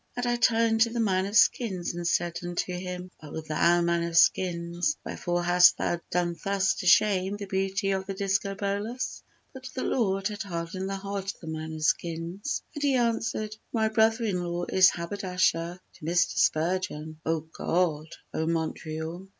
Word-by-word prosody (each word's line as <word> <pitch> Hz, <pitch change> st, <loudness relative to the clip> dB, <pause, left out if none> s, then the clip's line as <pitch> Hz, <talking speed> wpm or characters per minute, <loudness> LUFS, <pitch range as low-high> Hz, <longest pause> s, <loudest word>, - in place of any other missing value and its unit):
And 245 Hz, -, -1 dB
I 240 Hz, 0 st, +1 dB
turned 230 Hz, -1 st, +3 dB
to 230 Hz, -, +5 dB
the 235 Hz, +1 st, -3 dB
man 190 Hz, -4 st, +1 dB
of 205 Hz, +3 st, +1 dB
skins 190 Hz, -9 st, +2 dB
and 175 Hz, 0 st, -3 dB
said 175 Hz, 0 st, 0 dB
unto 175 Hz, +1 st, -3 dB
him, 180 Hz, 0 st, -5 dB
"O 155 Hz, 0 st, -6 dB
thou 170 Hz, +3 st, +2 dB
man 170 Hz, 0 st, +1 dB
of 170 Hz, 0 st, -1 dB
skins, 175 Hz, -, +2 dB
Wherefore 175 Hz, -1 st, -2 dB
hast 175 Hz, 0 st, +6 dB
thou 170 Hz, -, -1 dB
done 175 Hz, -1 st, 0 dB
thus 195 Hz, -1 st, +2 dB
to 185 Hz, -, -3 dB
shame 195 Hz, +1 st, +4 dB
the 205 Hz, -, -6 dB
beauty 195 Hz, +1 st, -1 dB
of 190 Hz, 0 st, -2 dB
the 195 Hz, -, -4 dB
Discobolus?" 200 Hz, +4 st, -2 dB, 0.3 s
But 260 Hz, -1 st, -9 dB
the 260 Hz, -, -2 dB
Lord 195 Hz, -4 st, 0 dB
had 210 Hz, 0 st, -6 dB
hardened 185 Hz, 0 st, -4 dB
the 195 Hz, -, -2 dB
heart 195 Hz, 0 st, -4 dB
of -, -, -25 dB
the -, -, -10 dB
man 160 Hz, 0 st, -5 dB
of 155 Hz, -, -6 dB
skins 170 Hz, -, -1 dB
And 295 Hz, -, -6 dB
he 280 Hz, -2 st, +2 dB
answered, 225 Hz, -3 st, 0 dB, 0.2 s
"My 220 Hz, -2 st, +1 dB
brother 225 Hz, +1 st, +3 dB
in 190 Hz, -5 st, 0 dB
law 175 Hz, 0 st, -3 dB
is 185 Hz, +1 st, +6 dB
haberdasher 180 Hz, -1 st, -1 dB
to -, -, -19 dB
Mr. 175 Hz, +2 st, +1 dB
Spurgeon." 155 Hz, -2 st, 0 dB
O 160 Hz, -1 st, 0 dB
God! 160 Hz, 0 st, -1 dB, 0.3 s
O 160 Hz, -, -1 dB
Montreal! 160 Hz, +2 st, -3 dB
185 Hz, 175 wpm, -27 LUFS, 170-205 Hz, 0.3 s, hast